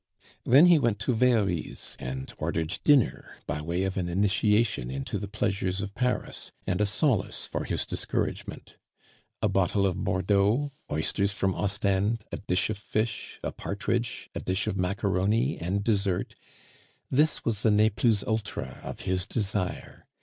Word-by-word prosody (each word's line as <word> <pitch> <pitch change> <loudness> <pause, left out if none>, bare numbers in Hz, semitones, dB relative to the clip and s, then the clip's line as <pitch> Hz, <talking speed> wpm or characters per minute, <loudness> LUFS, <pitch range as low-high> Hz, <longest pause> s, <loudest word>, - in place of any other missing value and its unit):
Then 140 +7 +7
he 175 -3 +7
went 120 -6 +1
to 125 - +1
Very's 110 -8 +1
and 65 +1 -5
ordered 80 +2 -2
dinner 145 -6 +3
by 75 +1 -3
way 85 +4 -1
of 95 +1 -2
an 90 -2 -1
initiation 105 - +2
into 70 +9 -3
the 100 - -5
pleasures 100 -3 -1
of 100 0 -4
Paris, 125 +3 -2
and 90 +2 0
a 105 - +3
solace 110 +2 0
for - - -3
his - - 0
discouragement. - - -3 0.7
A - - +5
bottle 95 +1 +2
of 90 -2 -1
Bordeaux, 100 +9 +2 0.2
oysters 100 +6 +1
from 95 -2 0
Ostend, 100 +2 0
a - - -3
dish 90 +1 0
of 105 - -5
fish, 110 +1 -3
a - - -2
partridge, 115 +4 -2
a - - -3
dish 95 +2 -1
of - - -1
macaroni 100 +6 +1
and 95 +4 -1
dessert, 100 -4 0 0.8
this 150 +4 +2
was 110 -3 0
the 110 - +4
ne 105 +1 +4
plus 105 0 +2
ultra 110 -4 -3
of - - -6
his 90 0 0
desire. 100 -4 -3
100 Hz, 155 wpm, -28 LUFS, 95-110 Hz, 0.8 s, Then